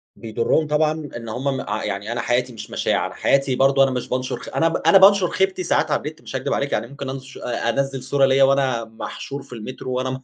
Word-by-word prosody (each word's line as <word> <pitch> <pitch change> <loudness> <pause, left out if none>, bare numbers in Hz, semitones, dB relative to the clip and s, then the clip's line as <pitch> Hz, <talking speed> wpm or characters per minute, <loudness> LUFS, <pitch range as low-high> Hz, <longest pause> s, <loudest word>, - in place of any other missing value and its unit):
بيضُرهم 115 +7 0
طبعًا 150 +1 +2 0.3
إن 115 -1 -8
هُم 135 +4 -2
م - - -3
ع 105 +1 -3
يعني 100 +3 -3
أنا 120 0 -2
حياتي 125 +2 0
مش 110 - -9
مشاع، - - 0
أنا - - -6
حياتي 135 -1 +2
برضه 135 +1 +4
أنا 135 - +2
مش 125 -1 -4
بانشر 130 -1 -2
خ - - -9
أنا 165 - +3
ب 165 - -1
أنا 165 +5 +5
بانشر 195 -1 +6
خيبتي 190 -1 0
ساعات 155 -2 +1
على 150 - +1
النت 155 +1 -7
مش - - -9
هاكدب 130 - -1
عليك 140 0 -1
يعني 115 - -1
ممكن 140 +1 -7
أنش 135 0 -8
آآ 120 -1 -2
أنزِّل 135 +1 -1
صورة 135 +1 +3
ليَّ 135 0 +3
وأنا 135 -4 +3
محشور 115 +5 -7
في 135 - -13
المترو، 130 +3 -7
وأنا 130 0 -1
م 130 0 -5
135 Hz, 245 wpm, -22 LUFS, 125-140 Hz, 0.3 s, بانشر